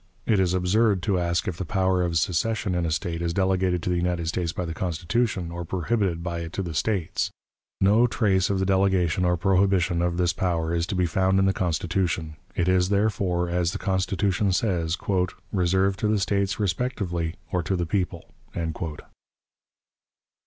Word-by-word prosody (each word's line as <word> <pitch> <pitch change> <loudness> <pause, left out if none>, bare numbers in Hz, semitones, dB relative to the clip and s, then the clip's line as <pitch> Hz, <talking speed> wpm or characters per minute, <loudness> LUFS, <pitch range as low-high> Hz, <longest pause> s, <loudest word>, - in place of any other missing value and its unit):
It 110 -4 +3
is 95 -1 +2
absurd 95 +1 +2
to 95 -1 +1
ask 85 0 0
if 90 -3 -3
the - - -3
power 95 +1 +1
of 85 -2 0
secession 95 +5 0
in 90 -1 0
a - - -2
State 85 +1 -2
is 85 0 -2
delegated 95 -2 +1
to - - -1
the 90 - +1
United 85 -1 -1
States 85 -1 -1
by 90 - -4
the 80 - -4
Constitution, 90 +2 -1
or 85 +1 -5
prohibited 90 0 -1
by 85 -1 -3
it 85 0 -6
to 95 - -2
the 85 -3 -5
States. 90 +2 -1 0.5
No 105 +5 +5
trace 105 -6 +1
of 100 - +1
the 95 - 0
delegation 95 -2 +2
or 90 0 +2
prohibition 95 -2 +2
of 85 0 0
this 90 -1 +2
power 85 -3 -1
is 85 0 0
to 100 - -3
be 90 -1 +2
found 95 +3 +2
in 95 - +4
the 95 - +3
Constitution. 85 -2 -1 0.2
It 85 - 0
is, 90 0 +3
therefore, 100 -4 +1
as 85 0 0
the - - -2
Constitution 95 0 0
says, 85 -5 0 0.6
"reserved 95 +1 +2
to 105 - +1
the 105 -1 +2
States 100 -1 0
respectively, 90 -5 -1 0.2
or 90 - +1
to 95 +3 -1
the 90 -1 -1
people." 90 -2 -2
90 Hz, 180 wpm, -25 LUFS, 85-95 Hz, 0.6 s, No